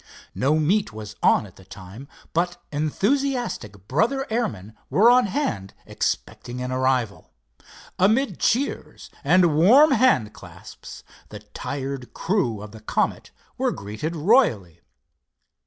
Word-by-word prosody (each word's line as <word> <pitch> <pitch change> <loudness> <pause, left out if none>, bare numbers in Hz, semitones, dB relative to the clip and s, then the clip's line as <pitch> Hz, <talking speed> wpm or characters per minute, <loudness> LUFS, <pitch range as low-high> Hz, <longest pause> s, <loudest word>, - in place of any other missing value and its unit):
No 145 +4 +1
meet 185 +5 +1
was 110 -1 -9
on - - +3
at 95 - -16
the 95 - -15
time, 95 +7 -12 0.3
but 175 +1 0
enthusiastic 190 - -2
brother 235 - 0
airmen 155 - -3
were 225 +5 +5
on 250 -3 +4
hand 115 - -3
expecting 120 +1 -4
an 125 0 -4
arrival. 130 -7 -1 0.7
Amid 215 +2 +2
cheers 260 +5 -2
and 170 +1 +4
warm 250 - +6
hand 235 - +3
clasps, - - -12 0.3
the - - -8
tired 135 -3 -6
crew 140 - -1
of 105 - -10
the 110 0 -12
Comet 110 - -2 0.3
were - - +1
greeted 110 +12 -5
royally. 150 - +2
150 Hz, 125 wpm, -23 LUFS, -, 0.7 s, warm